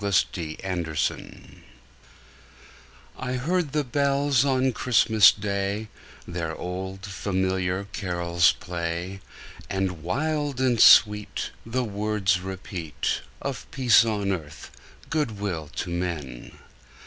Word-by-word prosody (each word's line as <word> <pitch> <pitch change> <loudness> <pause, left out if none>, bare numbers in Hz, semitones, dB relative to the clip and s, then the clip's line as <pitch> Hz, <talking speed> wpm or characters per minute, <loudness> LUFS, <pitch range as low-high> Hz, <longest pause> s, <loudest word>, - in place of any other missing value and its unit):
CHRISTMAS 85 -4 -1
BELLS - - -9 2.0
I 125 - -3
heard 155 +4 0
the 150 +1 +1
bells 140 0 +2
on 130 -1 +2
Christmas 110 -3 +5
Day 100 +1 -3 0.4
Their 85 -2 -4
old, 95 +2 -5
familiar 95 -1 -1
carols 85 -2 +2
play, 85 +2 -4 0.5
And 95 -4 -2
wild 145 - -1
and 125 -3 +2
sweet 105 -1 +5 0.2
The 125 +2 0
words 100 -3 0
repeat 90 -4 -4 0.2
Of - - -5
peace 125 -5 +5
on 105 -3 -1
earth, 80 -6 -6 0.4
good 145 -10 -1
will 85 -7 -3
to 90 - -3
men! 80 -8 -4
100 Hz, 100 wpm, -25 LUFS, 90-120 Hz, 2.0 s, Christmas